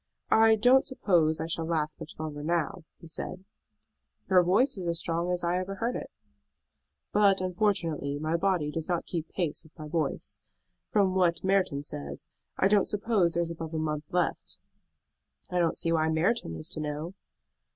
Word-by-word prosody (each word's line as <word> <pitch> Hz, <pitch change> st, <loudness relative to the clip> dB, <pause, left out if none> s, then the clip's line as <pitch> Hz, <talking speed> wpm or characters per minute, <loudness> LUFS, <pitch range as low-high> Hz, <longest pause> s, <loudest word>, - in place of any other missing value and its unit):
"I 225 Hz, 0 st, +6 dB
don't 250 Hz, +5 st, +5 dB
suppose 170 Hz, -, +2 dB
I 160 Hz, -, -2 dB
shall 165 Hz, 0 st, -2 dB
last 155 Hz, -2 st, -1 dB
much 160 Hz, -1 st, -8 dB
longer 155 Hz, -2 st, -5 dB
now," 170 Hz, +2 st, -1 dB
he 165 Hz, -, -12 dB
said. 180 Hz, +3 st, -6 dB, 0.9 s
"Your 185 Hz, -1 st, +7 dB
voice 195 Hz, +10 st, +3 dB
is 185 Hz, -3 st, -5 dB
as 170 Hz, 0 st, 0 dB
strong 170 Hz, +2 st, -1 dB
as 180 Hz, -1 st, -1 dB
I 175 Hz, +1 st, +1 dB
ever 190 Hz, +2 st, -4 dB
heard 235 Hz, +4 st, -1 dB
it." -, -, -5 dB, 1.0 s
"But 200 Hz, -2 st, +4 dB
unfortunately 175 Hz, -6 st, 0 dB
my 155 Hz, +2 st, -1 dB
body 175 Hz, -4 st, +1 dB
does 165 Hz, +2 st, -4 dB
not 175 Hz, -2 st, 0 dB
keep 165 Hz, -3 st, -4 dB
pace 170 Hz, -5 st, -2 dB
with 160 Hz, +1 st, -21 dB
my 155 Hz, -1 st, -7 dB
voice. 155 Hz, -2 st, -2 dB, 0.5 s
From 195 Hz, -3 st, +3 dB
what 180 Hz, -2 st, +2 dB
Merton 190 Hz, -7 st, +1 dB
says, 70 Hz, -, -6 dB, 0.3 s
I 190 Hz, -, +4 dB
don't 205 Hz, 0 st, +3 dB
suppose 205 Hz, -5 st, +1 dB
there 170 Hz, -, +1 dB
is 170 Hz, -, -4 dB
above 165 Hz, -1 st, -6 dB
a -, -, 0 dB
month 150 Hz, -1 st, -2 dB
left." 180 Hz, -1 st, -1 dB, 0.9 s
"I 180 Hz, -, +1 dB
don't 170 Hz, -2 st, +1 dB
see 165 Hz, -, 0 dB
why 160 Hz, -1 st, +2 dB
Merton 160 Hz, -, +1 dB
is 80 Hz, -, -5 dB
to -, -, -4 dB
know." 150 Hz, +3 st, -4 dB
170 Hz, 180 wpm, -29 LUFS, 155-190 Hz, 1.0 s, Your